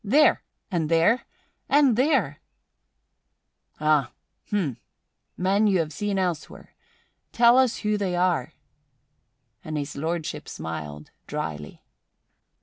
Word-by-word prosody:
There! 280 +9 +4 0.3
And 165 -4 -1
there! 170 +9 +3 0.4
And 280 -5 +5
there!" 245 - +1 1.4
"Ah! 150 -4 +2 0.4
Hm! 175 - -1 0.6
Men 195 +4 +2
you 195 -2 +3
have 160 -3 -1
seen 205 +4 -2
elsewhere! 175 -5 -3 0.6
Tell 235 0 +5
us 260 -2 +3
who 210 -1 0
they 185 -3 -1
are." 175 -7 0 1.1
And 155 -1 -4
His 145 0 -4
Lordship 160 +2 -3
smiled 75 -2 -7 0.2
dryly. 75 -2 -5
175 Hz, 105 wpm, -25 LUFS, 150-210 Hz, 1.4 s, And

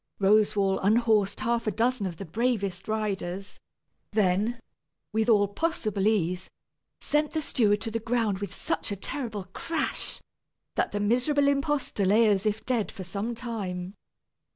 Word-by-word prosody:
Roswal 200 -1 +3
unhorsed 210 -1 +2
half 235 -1 0
a - - +2
dozen 230 0 +1
of 170 -3 -6
the 195 - -6
bravest 200 -1 -1
riders, 200 -3 -3 0.5
then, 210 +3 +2 0.5
with 220 +1 +1
all 205 -3 +5
possible 215 - -1
ease, 185 -4 0 0.5
sent 300 0 0
the 315 - 0
steward 210 -6 +2
to 225 - -2
the 230 - -1
ground 225 -4 0
with 200 - -4
such - - -2
a - - -1
terrible 215 0 -4
crash, 330 -2 -2 0.5
that - - 0
the 205 - -2
miserable 250 +7 +3
impostor 280 -6 0
lay 215 +4 +5
as 205 0 +2
if 215 +1 -2
dead 240 -5 0
for 190 - -8
some 200 +6 -3
time. 195 -6 -4
215 Hz, 150 wpm, -27 LUFS, 195-235 Hz, 0.5 s, all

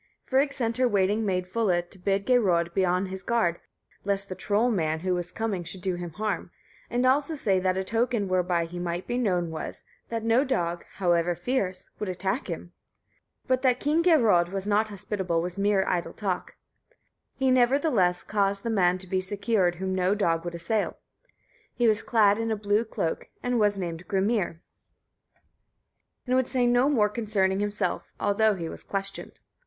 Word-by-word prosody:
Frigg 275 +2 +2
sent 235 -4 -1
her 255 0 +3
waiting 205 0 +1
maid 185 -1 0
Fulla 185 -3 +1
to 180 +2 -16
bid 195 +2 0
Geirröd 180 -9 +2
be 190 - +2
on 180 +1 +1
his 190 0 -6
guard, 190 -7 +1 0.4
lest 200 0 -1
the 185 - -4
trollmann 185 -6 0
who 185 0 0
was 175 0 -2
coming 205 -4 -2
should 180 +2 -7
do 190 -2 0
him 175 0 -5
harm, 215 +4 -3 0.4
and 245 +1 0
also 280 +4 +2
say 195 -9 +1
that 185 0 0
a 190 - 0
token 230 +1 0
whereby 180 -2 +1
he 175 +1 -7
might 175 0 -3
be 240 - -3
known 180 -7 0
was, 160 - -6 0.3
that 230 -1 -3
no 230 +4 +3
dog, 175 -11 -1
however 175 -2 +1
fierce, 185 -1 -2
would 210 - -3
attack 190 +7 -2
him. - - -6 0.7
But 255 -1 +1
that 255 -2 +2
King 305 +3 +2
Geirröd 220 - +4
was 195 0 -3
not 210 +1 +2
hospitable 190 -4 -2
was 180 +3 -4
mere 200 -1 +2
idle 175 -2 -1
talk. 195 -4 -3 0.8
He, 265 -1 +2
nevertheless, 245 - +3
caused 200 -1 0
the 230 - -1
man 180 -4 +3
to 185 - -9
be 185 +1 0
secured 200 -1 0
whom 190 +2 -3
no 185 +2 +2
dog 165 -5 +1
would 175 0 -5
assail. 200 +6 -1 0.8
He 240 -2 +2
was 215 0 +3
clad 210 -2 +3
in 225 0 -1
a 220 - +1
blue 205 +2 +1
cloak, 165 -6 -3
and 245 -1 +1
was 205 -1 +2
named 175 -2 -5
Grimnir, 195 -4 0 1.6
and 250 - -1
would 260 -1 +2
say 250 -2 +1
no 245 +3 +4
more 225 -8 +3
concerning 205 -3 0
himself, 205 0 -2
although 210 +1 +2
he 170 -3 -4
was - - -7
questioned. 195 0 -5
200 Hz, 180 wpm, -27 LUFS, 180-230 Hz, 1.6 s, Geirröd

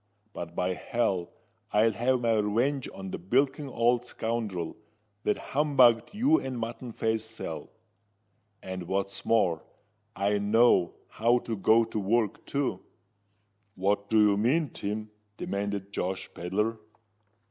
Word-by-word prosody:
But, 85 0 -7
by 90 +1 0
hell! 100 -5 -1 0.4
I'll 110 +2 +4
have 125 +3 +1
my 115 -2 +2
revenge 120 +6 0
on 95 -1 -7
the - - -4
bilking 135 - +1
old 120 0 +2
scoundrel 110 -8 -3 0.5
that 105 - +2 0.2
humbugged 130 - +4
you 275 +9 +4
and 130 -2 -4
Mutton 120 +1 -5
Face 110 0 -1
Sal. 110 -7 -6 0.9
And 95 -2 -6
what's 100 +1 -2
more, 95 -8 +2 0.5
I 100 +1 +1
know 105 -3 +4
how 120 +2 +2
to 115 - -2
go 110 +3 +4
to 110 -1 -3
work, 105 +1 0
too." 140 -1 -1 1.0
"What 100 +2 0
do 110 - +4
you 105 -1 +5
mean, 135 +7 +2
Tim?" 105 +1 -4 0.3
demanded 100 0 -3
Josh 95 +1 -3
Pedler. 105 +6 -1
110 Hz, 130 wpm, -28 LUFS, 100-120 Hz, 1.0 s, you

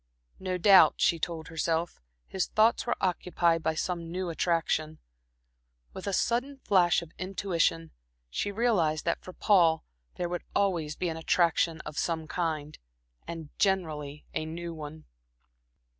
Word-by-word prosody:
No 185 -1 -2
doubt, 195 +1 +7
she 170 - +2
told 160 -1 -4
herself, 165 - -1 0.2
his 190 - -2
thoughts 225 +3 +3
were 240 - +1
occupied 175 -2 +1
by 160 0 0
some 170 0 -3
new 180 -1 -2
attraction. 160 -2 0 1.0
With - - -7
a - - 0
sudden 245 +8 0
flash 180 -8 +3
of 165 - -13
intuition, 175 -3 0 0.4
she 130 - -2
realized 195 -9 +1
that 170 - 0
for 185 - -9
Paul 170 -5 +3 0.3
there 175 - -2
would 175 0 -3
always 170 -7 +1
be 180 - -2
an 160 - -4
attraction 165 0 +2
of 150 - -6
some 165 -2 -1
kind, 155 -4 -3 0.5
and 165 -3 -6
generally 155 -7 -1
a - - -1
new 170 +2 -5
one. 155 0 -9
170 Hz, 145 wpm, -29 LUFS, 160-185 Hz, 1.0 s, doubt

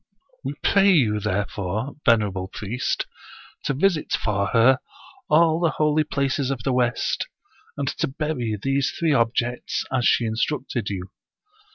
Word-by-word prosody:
We - - -4
pray 200 0 +5
you, 110 -10 +3
therefore, 105 +4 -2
venerable 105 -5 +2
priest, 110 +6 -3 0.6
to 135 - 0
visit 165 +1 +1
for 100 -2 0
her 125 +4 +4 0.5
all 160 +1 +4
the 170 -2 +1
holy 155 0 +3
places 140 -2 -1
of 130 -4 -3
the 135 - 0
west, 120 -2 0 0.5
and 140 -1 -2
to - - +1
bury 130 -6 -2
these 135 +4 0
three 165 -3 +2
objects, 120 0 0
as 125 -2 +1
she 120 - +3
instructed 120 0 -2
you. 95 -1 -5
125 Hz, 140 wpm, -23 LUFS, 110-145 Hz, 0.6 s, pray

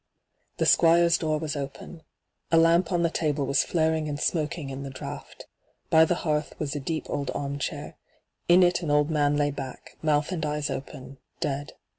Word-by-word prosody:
The - - +1
Squire's 170 0 +5
door 155 -1 0
was 155 0 -3
open. 145 +4 -7 0.5
A 165 - +4
lamp 165 +2 +4
on 175 -1 +1
the 170 - +3
table 150 -4 0
was 140 - +2
flaring 160 -2 0
and 145 0 -4
smoking 155 -3 -1
in 135 +1 -6
the 140 - -6
draught. 130 -1 -8 0.5
By 160 0 +7
the 175 - +1
hearth 150 -1 -1
was 150 -2 -3
a - - -2
deep 155 +3 -3
old 140 -1 -3
arm 140 0 -3
chair. - - -5 0.5
In 180 +1 +7
it 175 0 +2
an 165 - -3
old 150 +1 +2
man 145 -1 +2
lay 145 0 +1
back, 135 -2 -8
mouth 150 +1 +1
and 170 -3 -3
eyes 150 -1 -2
open, 135 0 -7 0.2
dead. 145 -3 -3
150 Hz, 190 wpm, -26 LUFS, 145-165 Hz, 0.5 s, By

